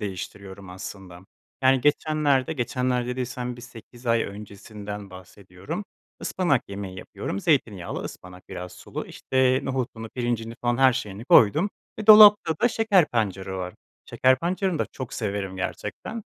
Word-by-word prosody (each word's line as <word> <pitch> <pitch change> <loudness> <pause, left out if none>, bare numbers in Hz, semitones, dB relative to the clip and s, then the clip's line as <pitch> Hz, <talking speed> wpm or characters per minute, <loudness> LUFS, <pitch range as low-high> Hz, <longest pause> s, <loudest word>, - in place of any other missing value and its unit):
değiştiriyorum, 95 -1 -7
aslında. 95 -1 -9 0.4
Yani, 130 0 +5
geçenlerde, 145 -1 +2
geçenler 125 -2 -1
dediysem 125 -1 -4
bir - - -11
8 120 +1 -13
ay 115 0 +3
öncesinden 105 0 -8
bahsediyorum, 95 - -8 0.4
ıspanak 150 - 0
yemeği 100 -2 -6
yapıyorum, 95 - -5
zeytinyağlı 105 - 0
ıspanak, 90 0 -10
biraz 90 0 -7
sulu, - - -7
işte, 130 0 +1
nohutunu, 125 -4 -3
pirincini 115 -1 -3
falan 120 0 +1
her 130 -1 +6
şeyini 105 0 -5
koydum 150 - +5 0.3
ve 215 - -5
dolapta 210 -6 +9
da 240 - +6
şeker 205 -8 +3
pancarı 95 -4 -2
var. 90 -1 -5 0.3
Şeker 130 0 +3
pancarını 180 +1 -1
da - - 0
çok 130 -1 -7
severim, 100 -3 -3
gerçekten. 155 - -5
120 Hz, 135 wpm, -25 LUFS, 100-135 Hz, 0.4 s, dolapta